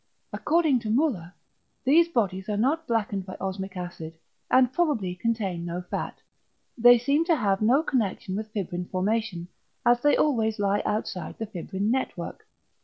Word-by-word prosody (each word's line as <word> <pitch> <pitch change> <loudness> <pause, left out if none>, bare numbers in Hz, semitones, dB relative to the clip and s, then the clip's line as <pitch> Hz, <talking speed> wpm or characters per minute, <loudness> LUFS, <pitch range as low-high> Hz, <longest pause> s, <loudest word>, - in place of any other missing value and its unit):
According 315 -5 +2
to 225 -2 -5
Müller 220 - 0 0.5
these 315 +6 +5
bodies 195 - -1
are 210 - -1
not 300 +9 +1
blackened 210 -4 -1
by 185 0 -8
osmic 190 0 -5
acid, 170 -3 -7 0.3
and 255 -1 +4
probably 265 - 0
contain 195 -3 -2
no 170 +1 -4
fat; 180 - -5 0.5
they 245 0 +7
seem 280 +6 +2
to 335 -2 +3
have 200 -7 0
no 255 +8 +4
connection 220 - -1
with 215 +1 -4
fibrin 180 -4 -3
formation, 190 -1 -2 0.4
as 240 0 +4
they 290 +2 +4
always 225 -7 +1
lie 205 0 +1
outside 195 -5 -3
the 225 - -3
fibrin 200 +1 -3
network. 265 +1 -3
215 Hz, 155 wpm, -26 LUFS, 190-255 Hz, 0.5 s, they